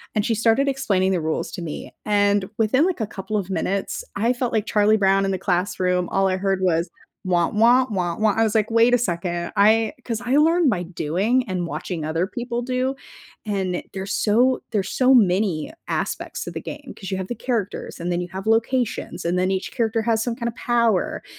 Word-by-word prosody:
and 210 -1 +1
she 230 - +1
started 230 +5 +2
explaining 195 -9 +1
the 180 -3 0
rules 160 0 -2
to 175 - -5
me, 160 -3 -6
and 205 -2 +2
within 255 +8 +3
like 360 -8 -2
a 220 - -1
couple 210 +2 -4
of 195 -2 -3
minutes, 195 +1 -2
I 230 +5 +2
felt 245 -1 -2
like 220 -2 +1
Charlie 215 0 +3
Brown 195 0 +3
in 195 - 0
the 190 - -1
classroom, 180 -1 0
all 195 0 +2
I 185 0 0
heard 195 0 0
was, 170 -2 +1 0.4
"Wah, 175 -2 +2
wah, 240 +4 +4
wah, 180 -5 -2
wah." 215 -1 +2
I 225 - +3
was 220 -1 +1
like, 220 0 +2
"Wait 230 +2 +4
a 245 - +6
second." 175 -5 -2
I 220 +2 +4
'cause 230 -2 -3
I 255 +3 +1
learned 325 0 +4
by 180 -5 0
doing 190 +9 0
and 180 -2 -2
watching 165 -1 -4
other 165 +4 -1
people 240 +2 -4
do. 255 +2 -1 0.5
And 190 -4 -1
there's 195 +1 -5
so 245 +5 +2
there's 200 -3 -1
so 260 0 +3
many 190 - +2 0.2
aspects - - -3
of - - -5
the - - -4
game, 285 -2 -8
'cause 195 -1 -7
you 190 - -1
have 190 -1 -4
the 240 - -3
characters, 230 -6 -3
and 175 +1 -2
then 175 - 0
you 180 - -3
have 190 +1 -5
locations, 230 +2 0
and 175 +2 0
then 185 +1 +1
each 190 0 -2
character 225 -2 0
has 225 0 +1
some 235 0 -2
kind 235 -2 -2
of 230 - -9
power. 235 -5 +1
205 Hz, 215 wpm, -22 LUFS, 185-235 Hz, 0.5 s, a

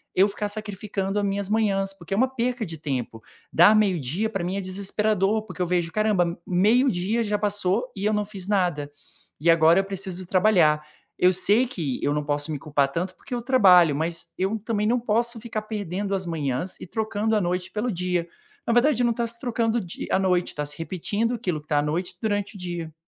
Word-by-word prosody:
eu 190 +2 +5
ficar 205 +1 -3
sacrificando 205 -1 -4
as 205 - +1
minhas 200 0 -2
manhãs, 200 -3 +1
porque 190 -1 -7
é - - 0
uma 255 +4 +4
perca 250 -1 -2
de 165 -5 -6
tempo. 130 -7 -4 0.3
Dar 175 +6 +6
meio-dia, 190 - +1
para 195 -5 -3
mim 180 +2 -2
é - - -2
desesperador, 200 +2 0
porque 185 -5 -11
eu - - +2
vejo, 175 -1 0
"Caramba, 215 -2 +2
m 170 0 -3
meio 215 +9 +3
dia 205 +4 0
já 210 -1 -1
passou 205 +3 0
e 200 0 -4
eu 215 - +2
não 210 0 +1
fiz 200 -3 -8
nada, 175 -8 0 0.5
e 170 - +2
agora 165 +2 +6
eu - - +2
preciso 190 -2 -5
trabalhar". 180 -6 +3 0.3
Eu 180 +1 +4
sei 205 +7 +4
que 165 - -3
eu 145 - +1
não 150 0 -1
posso 145 +1 -2
me 150 - -3
culpar 145 -2 +1
tanto, 180 +5 -3
porque - - -10
eu 240 - -2
trabalho, 185 - +5
mas 165 +3 -2
eu 195 +4 -1
também 210 0 -1
não 245 +2 +2
posso 235 +1 0
ficar 220 -1 -4
perdendo 205 -2 -3
as 190 -2 -3
manhãs 155 +1 -3
e - - -8
trocando 220 +1 -1
a 210 - +2
noite 180 +1 -2
pelo 225 +3 -2
dia. 180 -2 -1 0.4
Na - - +2
verdade, 245 +1 +3
não 240 -1 +2
tá 235 0 -1
se 235 0 -3
trocando 235 -2 0
o - - -4
di 175 -2 -7
a - - +3
noite, 180 -2 +1
tá 150 - -2
se 145 0 -6
repetindo 195 +8 -2
aquilo 185 -9 -2
que 150 - -30
tá 145 - +2
à - - +2
noite 165 +5 -2
durante 205 -2 -1
o - - -8
dia. 175 -3 -5
195 Hz, 220 wpm, -24 LUFS, 175-215 Hz, 0.5 s, Dar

